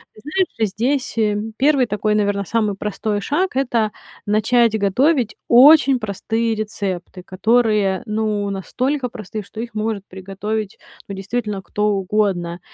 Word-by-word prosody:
Знаешь, 285 - -1
здесь, 250 +7 -1
э, 210 -2 +2 0.2
1 275 -1 +3
такой, 210 -1 0
наверно, 205 -1 +1
самый 215 -1 0
простой 210 +1 -2
шаг- 345 - -1
это 240 -5 +1 0.3
начать 220 +2 +3
готовить 240 - +2
очень 270 +1 +7
простые 225 +2 -2
рецепты, 200 -4 -4
которые, 210 0 +1
ну, 210 -2 -1
настолько 250 - -2
простые, 215 -1 -7
что 215 - -11
их 235 0 -5
может 215 -2 -2
приготовить, 195 +3 -5 0.3
ну, 200 - -6
действительно 205 +1 -3
кто 210 +2 -1
угодно. 190 -3 -1
215 Hz, 125 wpm, -20 LUFS, 200-240 Hz, 0.3 s, очень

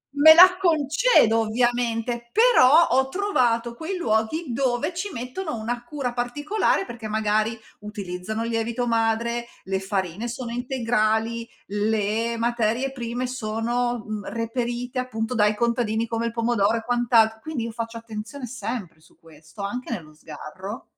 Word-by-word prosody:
me 315 +2 +9
la 365 +1 +8
concedo 310 - +4
ovviamente. 235 +1 0
Però, 450 - +6 0.2
ho 265 +1 +3
trovato 240 - +1
quei 340 +8 -5
luoghi 220 +4 0
dove 260 +6 0
ci 400 +4 -3
mettono 255 +5 -5
una 240 +2 -3
cura 250 -1 -4
particolare, 290 - 0
perché, 230 -2 -7
magari, 215 +1 0 0.2
utilizzano 210 +1 -5
il 230 - -3
lievito 230 +2 -1
madre, 230 +1 0 0.2
le 190 0 -2
farine 190 +2 -3
sono 240 -1 -5
integrali, 230 -2 0 0.2
le 215 +2 0
materie 235 +2 0
prime 245 0 -4
sono, 240 0 -2
mhmm, 210 -2 -5
reperite 240 +2 -3
appunto 235 -2 -3
dai 210 -2 +3
contadini, 230 -1 0
come 230 +1 -2
il - - -3
pomodoro 230 -2 +1
e 225 - -5
quant'al 230 -2 +3
quindi 275 -2 -4
io 230 - -4
faccio 230 0 -5
attenzione 230 +4 -7
sempre 230 -8 -6
su - - -24
questo, 160 +4 -14
anche 245 +5 -4
nello 160 -8 -6
sgarro. 165 - -9
235 Hz, 140 wpm, -24 LUFS, 220-250 Hz, 0.2 s, me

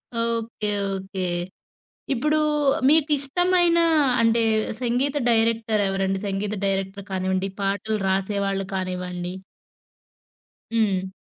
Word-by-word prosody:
Okay, 230 -2 -2 0.3
okay, 190 0 -5 0.9
ఇప్పుడు 300 +5 +1 0.5
మీకిష్టమైన 325 +4 +3 0.4
అంటే 230 0 +3 0.4
సంగీత 255 +4 0
డైరెక్టరెవరండి? 215 -4 +1
సంగీత 200 +1 -2
డైరెక్టర్ 195 0 -2
కానివ్వండి, 190 0 -1
పాటలు 200 +2 -1
రాసేవాళ్ళు 195 0 0
కానివ్వండి? 180 -1 -4 1.4
హ్మ్. 195 -4 +1
205 Hz, 75 wpm, -24 LUFS, 190-235 Hz, 1.4 s, మీకిష్టమైన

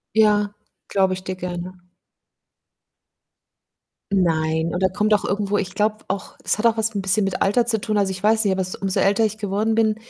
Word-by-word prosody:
Ja, 210 -1 +3 0.3
glaube 190 -1 +2
ich 185 0 -9
dir 185 - -4
gerne. 180 0 -6 2.3
Nein, 160 -3 +1
und 180 +2 -2
da 185 - +4
kommt 210 +3 0
auch 205 - +3
irgendwo 205 +1 0
ich 190 -1 -4
glaube 215 +1 +1
auch, 195 0 -4
es - - +1
hat 215 - -4
auch 230 -1 +3
was 220 0 0
'n 200 - -2
bisschen 195 +2 +2
mit 195 - -1
Alter 230 +4 +2
zu 225 -2 +1
tun. 215 -1 -1
Also, 195 -1 +1
ich 190 0 -6
weiß 220 +1 +4
nicht, 200 - +2
aber 190 0 0
s 185 - -5
umso 195 -1 -1
älter 205 +3 +3
ich 215 - -4
geworden 215 +1 -1
bin 220 -1 +2
200 Hz, 210 wpm, -22 LUFS, 185-215 Hz, 2.3 s, da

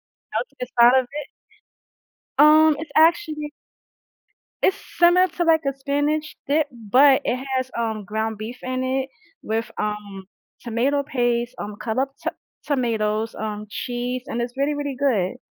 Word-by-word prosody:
melted - - -6
inside 250 +1 +5
of 260 - +1
it. 290 +4 -7 1.1
Um, 310 +1 +7
it's 320 - -7
actually 315 -2 +3 1.1
It's 385 - +3 0.2
similar 350 +2 +6
to, 345 0 -2
like, 325 -1 +4
a 275 - +1
spinach 290 +3 -1
dip, 300 +1 +2
but 255 +5 +4
it 245 - +1
has, 260 0 -2
um, 220 -3 -2
ground 220 +2 -2
beef 230 +3 -6
in 255 0 -2
it 265 +1 -1 0.3
with, 225 +1 -2
um, 210 -2 -4 0.4
tomato 255 +5 0
paste, 240 -2 0
um, 205 0 -5
cut 225 +1 -2
up 270 +1 +1
t - - +1 0.4
tomatoes, 225 -5 0
um, 210 -1 -5
cheese, 245 +3 -3
and 235 -2 -3
it's 245 +2 -5
really, 285 +2 +1
really 285 -2 -3
good. 220 -10 +1
255 Hz, 145 wpm, -23 LUFS, 225-290 Hz, 1.1 s, Um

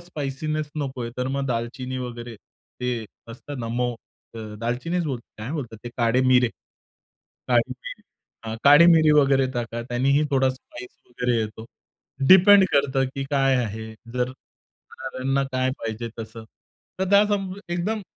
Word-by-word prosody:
Spiciness 155 -1 -4
नकोय, 130 -4 -4
तर 125 0 -1
मग 140 0 -1
दालचिनी 125 +2 -3
वगैरे. 120 -2 -6 0.4
ते 125 -2 -2 0.2
असतात 135 +5 -8
ना 115 -2 -4
मो 120 -1 0 0.4
अ, - - -7 0.2
दालचिनीच 150 +10 -1
बोल 135 -5 -2 0.2
काय 110 +4 -5
बोलतात 120 -8 -5
ते, - - -4
काढे 120 +1 +2
मिरे. 125 -2 +4 1.0
काळी - - +3
मिरी - - -10 0.4
हां, 110 0 -4
काळी 145 +4 +8
मिरी 160 -3 +6
वगैरे 135 -2 +4
टाका, 120 -1 -3
त्यानेही 135 +4 +1
थोडा 135 -1 +3
स्पायस 125 -1 -10 0.2
वगैरे 125 0 -1
येतो. 110 0 -4 0.6
डिपेंड 190 +1 +8
करतं, 140 -1 +2
की 135 - -3
काय 135 -2 +3
आहे, 110 +1 -6 0.2
जर 125 0 0 0.6
खाणाऱ्यांना 135 +2 -2
काय 130 0 +1
पाहिजे 115 +1 -4
तसं. 110 0 -8 0.6
तर 190 - +3
त्या 200 +1 +6
संब 195 -2 -2
एकदम 195 +5 -2
130 Hz, 145 wpm, -24 LUFS, 120-145 Hz, 1.0 s, काळी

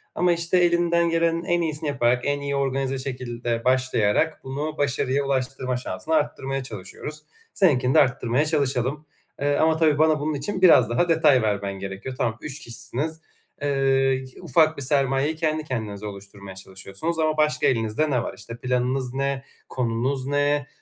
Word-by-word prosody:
Ama 175 0 +3
işte 170 +2 0
elinden 170 -1 +3
gelenin 165 0 +1
en 175 -2 +1
iyisini 155 -2 -2
yaparak, 125 -3 +2
en 145 0 0
iyi 140 0 -2
organize 135 -1 -1
şekilde 120 -3 -4
başlayarak 130 +2 +1
bunu 150 +4 -4
başarıya 140 0 0
ulaştırma 130 -1 -1
şansını 125 +6 -3
arttırmaya 135 -3 -1
çalışıyoruz. 125 +8 -8 0.3
Seninkini 135 - +3
de - - +6
arttırmaya 125 +1 +2
çalışalım. 140 -1 -1 0.4
Eee, 145 0 +2
ama 160 0 +3
tabii 155 -3 +3
bana 155 -1 +4
bunun 155 +1 -1
için 165 +7 -3
biraz 145 -11 +7
daha 130 +9 +1
detay 150 -6 +4
vermen 100 -2 -1
gerekiyor. 100 +7 -6
Tamam, 115 -1 -1
3 150 0 -7
kişisiniz. 150 +7 -5 0.4
Eee, 145 - -1
y 135 -1 +2 0.2
ufak 160 -1 +3
bir - - -5
sermayeyi 135 +2 +1
kendi 155 -1 -1
kendinize 110 -6 -5
oluşturmaya 100 -1 -9
çalışıyorsunuz 95 - -6
ama 155 -1 +1
başka 150 0 +2
elinizde 115 +6 0
ne 125 -3 +1
var? - - -5
İşte, 115 0 -9
planınız 125 +1 -1
ne? 135 0 -1 0.3
Konunuz 130 +2 -1
ne? 145 0 +1
135 Hz, 160 wpm, -24 LUFS, 125-155 Hz, 0.4 s, biraz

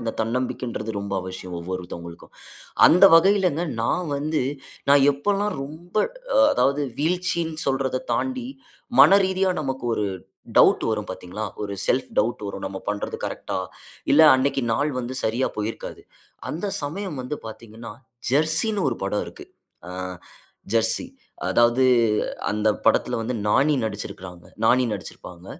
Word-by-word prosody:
அந்த 115 -1 -3
தன்னம்பிக்கைன்றது 115 -2 -3
ரொம்ப 100 -1 -4
அவசியம் 95 -1 -7
ஒவ்வொருத்தவங்களுக்கும். 85 -1 -7 0.5
அந்த 180 +4 +6
வகையிலங்க 180 -2 +4 0.2
நான் 170 +9 0
வந்து 150 0 -1 0.5
நான் 140 -1 +6
எப்பல்லாம் 200 +8 -1
ரொம்ப 160 +5 -12 0.4
அ - - +7
அதாவது 145 - +1
வீழ்ச்சின்னு 170 0 -1
சொல்றத 135 -1 0
தாண்டி, 260 -2 -2 0.5
மன 195 - +8
ரீதியா 190 0 +1
நமக்கு 135 -3 -4
ஒரு 105 - -1 0.5
டவுட் - - +5
வரும் 105 -1 -2
பாத்தீங்களா? 95 +3 -6 0.2
ஒரு 100 - -4
செல்ஃப் 130 +1 +1
டவுட் 110 0 0
வரும். 100 -1 -6
நம்ம 95 - -5
பண்றது 105 0 -3
கரெக்ட்டா! - - -4 0.5
இல்ல 150 - +6
அன்னக்கி 135 0 +1
நாள் 145 +5 0
வந்து 125 +1 -4
சரியா 115 +4 +1
போயிருக்காது. 105 +1 -5 0.5
அந்த 170 +6 -3 0.2
சமயம் 160 +1 -4
வந்து 130 +4 -4
பார்த்தீங்கன்னா, 115 +1 -10 0.4
ஜெர்சினு 160 - +1
ஒரு - - -2
படம் 105 +1 -1
இருக்கு. - - -11 0.4
ஆ 90 - -8 0.8
ஜெர்சி. 115 - +2 0.5
அதாவது 120 +2 +4 0.6
அந்த 105 +1 +1 0.2
படத்தில - - +2
வந்து, 120 +2 -3
நானி 140 +7 +3
நடுச்சுருக்காங்க 95 -4 -7 0.2
நானி 125 +3 +4
நடுச்சுருப்பாங்க. 90 -2 -9
130 Hz, 130 wpm, -23 LUFS, 105-160 Hz, 0.8 s, மன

